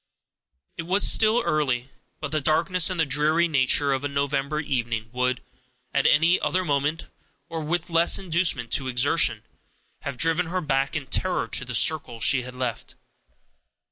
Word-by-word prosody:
It 165 Hz, -, -4 dB
was 195 Hz, +3 st, +4 dB
still 220 Hz, +2 st, +4 dB
early, 140 Hz, -6 st, -1 dB, 0.3 s
but 155 Hz, -, -6 dB
the 155 Hz, -1 st, -1 dB
darkness 165 Hz, +5 st, +2 dB
and 185 Hz, -2 st, -4 dB
the 160 Hz, -, +3 dB
dreary 150 Hz, +4 st, +2 dB
nature 140 Hz, -1 st, +1 dB
of 135 Hz, +1 st, -3 dB
a -, -, -1 dB
November 140 Hz, +1 st, -2 dB
evening 115 Hz, -6 st, -3 dB
would, 125 Hz, 0 st, -2 dB, 0.5 s
at 140 Hz, -, +2 dB
any 165 Hz, +5 st, +3 dB
other 185 Hz, 0 st, -1 dB
moment, 145 Hz, +2 st, -2 dB, 0.4 s
or 165 Hz, -1 st, -5 dB
with 165 Hz, +3 st, -3 dB
less 170 Hz, 0 st, +3 dB
inducement 165 Hz, -9 st, 0 dB
to 135 Hz, -, +1 dB
exertion, 125 Hz, -2 st, +1 dB, 0.6 s
have 140 Hz, -2 st, -6 dB
driven 165 Hz, +4 st, +1 dB
her 185 Hz, +2 st, -2 dB
back 135 Hz, -4 st, -1 dB
in 150 Hz, -3 st, -3 dB
terror 180 Hz, +1 st, -1 dB
to -, -, -1 dB
the 125 Hz, 0 st, -4 dB
circle 140 Hz, -3 st, +2 dB
she 130 Hz, +3 st, +3 dB
had 125 Hz, 0 st, -9 dB
left. 125 Hz, -3 st, -5 dB
145 Hz, 165 wpm, -24 LUFS, 130-165 Hz, 0.6 s, was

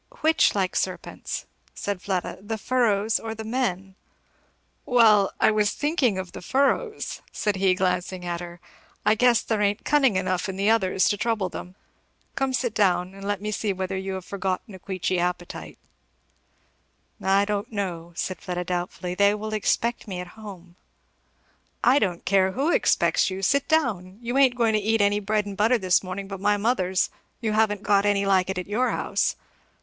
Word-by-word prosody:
"Which 315 Hz, -6 st, +3 dB
like 190 Hz, -2 st, 0 dB
serpents," -, -, -3 dB, 0.3 s
said 200 Hz, -3 st, -3 dB
Fleda, 185 Hz, -3 st, -3 dB
"the 220 Hz, +2 st, -4 dB
furrows 220 Hz, -2 st, +1 dB
or 225 Hz, 0 st, -5 dB
the 220 Hz, -, -6 dB
men?" 215 Hz, -5 st, -2 dB, 0.9 s
"Well, 215 Hz, -5 st, +5 dB
I -, -, +5 dB
was 210 Hz, -1 st, +1 dB
thinking 290 Hz, -, +1 dB
of 185 Hz, -2 st, -5 dB
the -, -, -9 dB
furrows," 280 Hz, -, 0 dB
said 205 Hz, -2 st, -1 dB
he 190 Hz, -1 st, +3 dB
glancing 180 Hz, 0 st, -1 dB
at 175 Hz, -1 st, -2 dB
her; 175 Hz, 0 st, -9 dB, 0.5 s
"I 210 Hz, -, +5 dB
guess 235 Hz, +1 st, +3 dB
there 220 Hz, -2 st, -1 dB
ain't 205 Hz, +1 st, 0 dB
cunning 270 Hz, -8 st, +3 dB
enough 185 Hz, 0 st, -1 dB
in 190 Hz, -, -4 dB
the 200 Hz, +3 st, +2 dB
others 190 Hz, -4 st, +2 dB
to 205 Hz, -, 0 dB
trouble 215 Hz, -3 st, 0 dB
them. 180 Hz, +1 st, -8 dB, 0.6 s
Come 270 Hz, -1 st, -1 dB
sit 250 Hz, -3 st, -1 dB
down, 185 Hz, -3 st, +1 dB
and 195 Hz, 0 st, -11 dB
let 205 Hz, 0 st, -2 dB
me 215 Hz, -, -2 dB
see 210 Hz, 0 st, -1 dB
whether 190 Hz, 0 st, -3 dB
you 190 Hz, 0 st, -3 dB
have 190 Hz, -1 st, -6 dB
forgotten 195 Hz, +1 st, -3 dB
a 190 Hz, -, -10 dB
Queechy 185 Hz, -1 st, -2 dB
appetite." 175 Hz, 0 st, -4 dB, 1.4 s
"I 195 Hz, +1 st, +3 dB
don't 205 Hz, +3 st, -3 dB
know," 175 Hz, -5 st, -4 dB
said 185 Hz, 0 st, -4 dB
Fleda 180 Hz, -1 st, -3 dB
doubtfully, 180 Hz, 0 st, -3 dB
"they 200 Hz, +2 st, +3 dB
will 215 Hz, +1 st, -5 dB
expect 235 Hz, +2 st, 0 dB
me 185 Hz, -3 st, -5 dB
at 180 Hz, 0 st, -7 dB
home." 185 Hz, -5 st, -11 dB, 1.1 s
"I 260 Hz, +4 st, +5 dB
don't 180 Hz, -7 st, -2 dB
care 190 Hz, 0 st, +3 dB
who 285 Hz, -, +1 dB
expects -, -, +2 dB
you 190 Hz, +1 st, -5 dB
sit 280 Hz, +7 st, +2 dB
down! 210 Hz, -, 0 dB
you 240 Hz, +1 st, -4 dB
ain't 270 Hz, -2 st, +5 dB
going 230 Hz, -2 st, +2 dB
to 215 Hz, -, +3 dB
eat 220 Hz, +2 st, +1 dB
any 205 Hz, 0 st, +3 dB
bread 210 Hz, 0 st, 0 dB
and 200 Hz, -1 st, -6 dB
butter 225 Hz, +5 st, +3 dB
this 185 Hz, -3 st, +2 dB
morning 190 Hz, +1 st, -5 dB
but 195 Hz, -1 st, -6 dB
my 205 Hz, +1 st, +3 dB
mother's 195 Hz, -4 st, +1 dB, 0.3 s
you 225 Hz, -3 st, -1 dB
haven't 210 Hz, -2 st, +1 dB
got 200 Hz, -1 st, +3 dB
any 205 Hz, -1 st, +2 dB
like 190 Hz, -1 st, +2 dB
it 190 Hz, -, -2 dB
at 180 Hz, -, -3 dB
your 235 Hz, +5 st, 0 dB
house. -, -, 0 dB
200 Hz, 185 wpm, -25 LUFS, 185-220 Hz, 1.4 s, Well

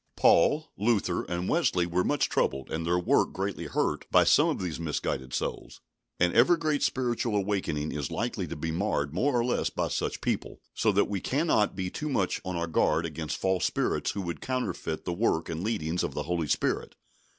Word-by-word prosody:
Paul, 150 Hz, -, +4 dB
Luther, 100 Hz, -4 st, +1 dB
and 90 Hz, +1 st, -3 dB
Wesley 90 Hz, -, +2 dB
were 90 Hz, +1 st, 0 dB
much -, -, +1 dB
troubled, 65 Hz, 0 st, -1 dB
and 80 Hz, +1 st, -2 dB
their 90 Hz, +1 st, +2 dB
work 90 Hz, -, +2 dB
greatly 95 Hz, +1 st, -3 dB
hurt, -, -, -1 dB
by -, -, +6 dB
some -, -, +5 dB
of -, -, -1 dB
these 90 Hz, -4 st, -3 dB
misguided 70 Hz, -5 st, -3 dB
souls, -, -, -4 dB, 0.4 s
and 90 Hz, 0 st, +3 dB
every 135 Hz, +9 st, +5 dB
great 155 Hz, -3 st, 0 dB
spiritual 120 Hz, -3 st, 0 dB
awakening 95 Hz, -7 st, -1 dB
is 75 Hz, -4 st, -3 dB
likely -, -, -2 dB
to -, -, -5 dB
be 80 Hz, +2 st, -3 dB
marred 80 Hz, -5 st, -1 dB
more 130 Hz, -, +1 dB
or 120 Hz, -, +1 dB
less 125 Hz, -, 0 dB
by -, -, -2 dB
such -, -, -2 dB
people; -, -, -2 dB
so 110 Hz, -, +2 dB
that 100 Hz, 0 st, +3 dB
we 100 Hz, -3 st, -3 dB
cannot 135 Hz, -, +1 dB
be 95 Hz, -1 st, -3 dB
too 150 Hz, -, -4 dB
much 100 Hz, -10 st, 0 dB
on 95 Hz, -1 st, -4 dB
our 85 Hz, 0 st, -1 dB
guard 80 Hz, 0 st, +1 dB
against 80 Hz, -1 st, -4 dB
false 95 Hz, -1 st, 0 dB
spirits 95 Hz, -, 0 dB
who 100 Hz, -, -3 dB
would 85 Hz, -1 st, -5 dB
counterfeit 100 Hz, -11 st, -3 dB
the 85 Hz, -, -1 dB
work 85 Hz, -4 st, 0 dB
and 85 Hz, +1 st, -3 dB
leadings 90 Hz, -6 st, -1 dB
of -, -, -3 dB
the 75 Hz, -, -2 dB
Holy 85 Hz, 0 st, -1 dB
Spirit. -, -, -1 dB
90 Hz, 200 wpm, -28 LUFS, 80-110 Hz, 0.4 s, by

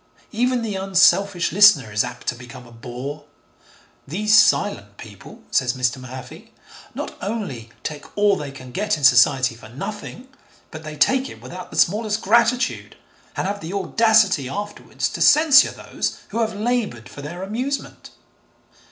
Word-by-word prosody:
Even 245 Hz, +1 st, 0 dB
the 215 Hz, -2 st, -3 dB
unselfish 190 Hz, -1 st, +2 dB
listener 185 Hz, -, +5 dB
is 105 Hz, +1 st, +1 dB
apt 125 Hz, 0 st, -8 dB
to -, -, -1 dB
become 125 Hz, +1 st, -12 dB
a 120 Hz, -, -16 dB
bore. 125 Hz, +5 st, -8 dB, 0.8 s
'These 210 Hz, +8 st, +1 dB
silent 200 Hz, -, +2 dB
people,' 105 Hz, -3 st, -13 dB
says 125 Hz, -1 st, +1 dB
Mr. 125 Hz, 0 st, -1 dB
Mahaffy, 130 Hz, 0 st, -11 dB, 0.4 s
'not -, -, -6 dB
only 190 Hz, -, -5 dB
take 150 Hz, +4 st, -8 dB
all 205 Hz, -1 st, +4 dB
they 145 Hz, -1 st, -6 dB
can 130 Hz, -2 st, -11 dB
get 205 Hz, +3 st, -1 dB
in 150 Hz, -, -9 dB
Society 130 Hz, 0 st, +5 dB
for 115 Hz, -1 st, -14 dB
nothing, 205 Hz, -, -8 dB, 0.4 s
but 155 Hz, 0 st, -9 dB
they 155 Hz, -1 st, -8 dB
take 265 Hz, -, +2 dB
it -, -, -12 dB
without 180 Hz, +1 st, -9 dB
the -, -, -9 dB
smallest 210 Hz, +3 st, +1 dB
gratitude, 235 Hz, +4 st, +1 dB, 0.4 s
and -, -, -1 dB
have 200 Hz, +1 st, -3 dB
the 165 Hz, +4 st, -6 dB
audacity 200 Hz, -, +2 dB
afterwards 205 Hz, +6 st, -4 dB
to -, -, -7 dB
censure 300 Hz, -2 st, +6 dB
those -, -, -5 dB
who 230 Hz, -, -3 dB
have 220 Hz, -2 st, -1 dB
laboured 210 Hz, -, -2 dB
for 145 Hz, -, -11 dB
their 170 Hz, +6 st, -7 dB
amusement.' 250 Hz, +8 st, -5 dB
185 Hz, 155 wpm, -21 LUFS, 130-215 Hz, 0.8 s, censure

